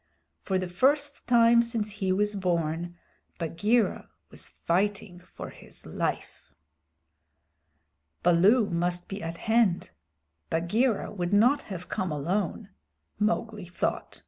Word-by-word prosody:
For 190 - -1
the 185 0 -2
first 285 +10 +1
time 235 -1 +6
since 230 -3 -2
he 195 -2 -1
was 205 +2 +1
born, 175 -2 -1 0.4
Bagheera 205 +8 0 0.2
was - - -5
fighting 190 0 -1
for 180 - -10
his - - -10
life. - - -4 1.7
"Baloo 195 +7 +5
must 175 +1 -1
be 195 +1 -6
at 165 +1 -5
hand; 220 -5 +1 0.6
Bagheera 205 +8 +1
would 180 -2 -3
not 245 +8 +5
have 180 -2 -6
come 185 -5 -2
alone," 185 +7 -2 0.5
Mowgli 215 -1 -1
thought. 175 - -3
195 Hz, 115 wpm, -27 LUFS, 175-225 Hz, 1.7 s, time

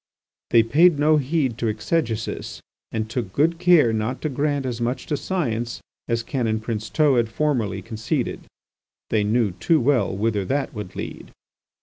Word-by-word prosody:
They 115 -1 +6
paid 155 +7 +4
no 155 +2 +4
heed 135 -4 0
to 115 - 0
exegesis 110 +1 -2 0.3
and 110 -1 -2
took 110 -3 -4
good 165 - +1
care 170 -10 +5
not 110 +4 -2
to 155 - 0
grant 145 0 -1
as 120 -2 -3
much 125 +2 -2
to 150 - -1
science 120 - -2 0.3
as 115 -1 0
Canon 115 -3 -1
Princeteau 115 +6 +1
had 115 -2 +2
formerly 115 -8 -1
conceded. 115 - -3 0.7
They 105 -2 +2
knew 110 0 +2
too 155 - +2
well 125 -5 +2
whither 105 -1 0
that 135 +8 -2
would 105 -5 -7
lead. - - -7
120 Hz, 155 wpm, -23 LUFS, 110-145 Hz, 0.7 s, They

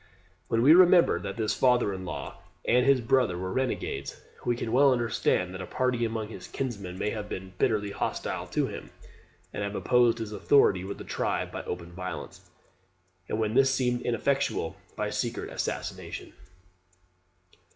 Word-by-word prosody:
] 90 0 -35
When 115 0 +1
we 145 +4 +8
remember 180 0 +6
that 100 +1 -6
his 110 -2 0
father 125 -5 +3
in 95 -1 -6
law 90 - -6 0.3
and 125 +2 +3
his 135 -2 +5
brother 115 -6 +2
were 95 +1 -4
renegades, 130 -1 -2 0.2
we 120 - +1
can 115 -1 -4
well 135 +3 +5
understand 115 -6 +1
that 95 - -6
a 95 - -6
party 125 -2 0
among 110 -2 -2
his - - -9
kinsmen 100 -9 -4
may 105 - -1
have 105 -2 -5
been 95 0 -6
bitterly 105 -2 +1
hostile - - -3
to - - 0
him, - - -7 0.6
and - - -4
have 100 0 -3
opposed 120 0 +3
his 110 -2 -5
authority 105 -3 +3
with 100 +1 -5
the - - -8
tribe - - -2
by - - -5
open 85 0 -5
violence, 90 +1 -7 0.8
and - - -1
when 110 -1 0
that 135 +2 +5
seemed 125 -2 +1
ineffectual, 125 -7 0 0.2
by - - -2
secret - - -3
assassination. - - -5
115 Hz, 170 wpm, -28 LUFS, 100-125 Hz, 0.8 s, we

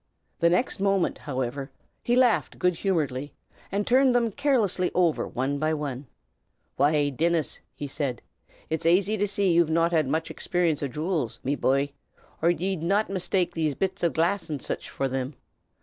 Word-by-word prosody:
The 170 - +4
next 190 +4 0
moment, 195 -2 +1
however, 135 0 -3 0.3
he 240 - +1
laughed 250 -3 +3
good 180 0 +2
humoredly 145 -8 -1 0.4
and 200 +1 0
turned 260 0 +4
them 235 -2 +2
carelessly 225 -10 +1
over 175 -3 +2
one 135 +3 -2
by 155 +1 +1
one. 140 -3 -5 0.7
"Why, 145 +1 +3
Dinnis," 165 +3 0 0.2
he 145 - -5
said, 135 -3 -3 0.5
"'tis 160 +1 0
aisy 190 +5 +3
to 205 0 0
see 200 -1 +1
that - - +4
ye've 170 -1 +4
not 165 +1 +2
had 155 -4 +2
mich 160 +4 -1
expeerunce 175 -4 0
o' 140 - 0
jew'ls, 150 - -2
me 135 - 0
bye, 140 0 +1 0.5
or 165 - +4
ye'd 180 0 -1
not 195 +4 +1
mistake 180 -1 0
these 155 -4 0
bits 190 -1 -2
o' 170 - +4
glass 170 +5 0
an' 150 -2 -3
sich - - -4
fer 135 - -2
thim. 130 +1 -3
165 Hz, 175 wpm, -26 LUFS, 145-195 Hz, 0.7 s, The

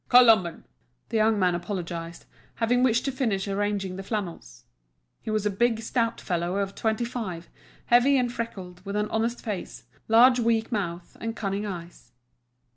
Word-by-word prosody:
"Colomban!" 225 -9 +6 0.5
The 230 - 0
young 220 0 +3
man 180 -3 +3
apologised, 170 -2 -5 0.3
having 245 +2 +2
wished 245 -2 +3
to 275 - 0
finish 225 -7 -1
arranging 200 -2 -1
the - - -4
flannels. 185 - -5 0.6
He 220 - -6
was 215 -1 0
a 210 - +2
big, 225 +3 +1
stout 230 0 -1
fellow 175 0 -2
of 200 -1 -1
twenty 220 +3 -1
five, 200 -9 -5 0.4
heavy 245 +4 +5
and 245 -2 0
freckled, 185 -7 -6
with 200 +1 -5
an 210 0 -1
honest 230 +2 -1
face, 210 -5 -5 0.2
large 245 +3 +6
weak 225 -1 +1
mouth, 175 -5 -3
and 225 0 -3
cunning 200 -1 -2
eyes. 170 -10 -8
210 Hz, 160 wpm, -26 LUFS, 185-230 Hz, 0.6 s, Colomban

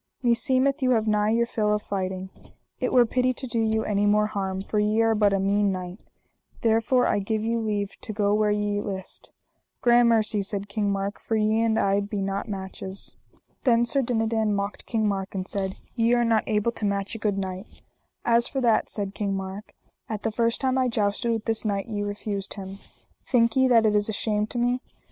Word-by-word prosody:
meseemeth 260 +3 +2
you 255 - +2
have 220 - -1
nigh 210 -1 +2
your 235 +1 +2
fill 215 -3 0
of - - -1
fighting, 190 -1 -4 0.5
it - - -1
were 245 -1 +6
pity 255 +2 +1
to 265 - -7
do 235 -2 -2
you 220 0 +1
any 205 0 +1
more 210 +1 +4
harm, 195 -2 -3
for 210 - -1
ye 210 +1 +2
are 225 0 +4
but 210 -2 +3
a 195 - +1
mean 200 +1 +2
knight, 185 +1 -5 0.6
therefore 230 +2 +3
I - - +2
give 215 +2 -2
you 230 +1 0
leave 205 -3 -2
to - - -6
go 205 -1 +1
where 210 0 +2
ye 205 0 0
list. 195 -2 -6 0.5
Gramercy, 235 -3 +4
said 200 0 -4
King 205 0 -1
Mark, 195 +1 -2
for 225 - -2
ye 215 +1 +2
and 225 -1 +2
I 200 -1 +2
be 205 0 -3
not 195 +3 -3
matches. 190 0 -6 0.5
Then 235 -3 +4
Sir 275 +3 +2
Dinadan 225 -3 0
mocked 200 +1 -4
King 220 -2 0
Mark 195 -1 -3
and 185 0 -3
said: 190 -1 -3 0.2
Ye 235 0 +3
are 240 0 +2
not 225 -2 +2
able 215 +2 +1
to 220 - -5
match 200 -1 -1
a 225 - -6
good 205 -2 0
knight. 190 +1 -6 0.4
As 235 0 +3
for 270 - -3
that, 235 -4 +2
said 200 -2 -3
King 200 -1 -2
Mark, 195 +2 -6 0.4
at 215 -2 -4
the 225 - 0
first 230 +1 0
time 260 -1 +1
I 255 - +2
jousted 220 0 0
with 225 -1 -2
this 225 -1 -1
knight 200 -3 -1
ye 210 -3 -4
refused 205 -1 -4
him. 195 -1 -8 0.5
Think 230 -3 +3
ye 260 0 +4
that 230 -3 +5
it 210 -1 +3
is 205 +1 +1
a - - -1
shame 210 0 0
to 240 - -6
me? 245 +1 +1
210 Hz, 215 wpm, -25 LUFS, 200-230 Hz, 0.6 s, were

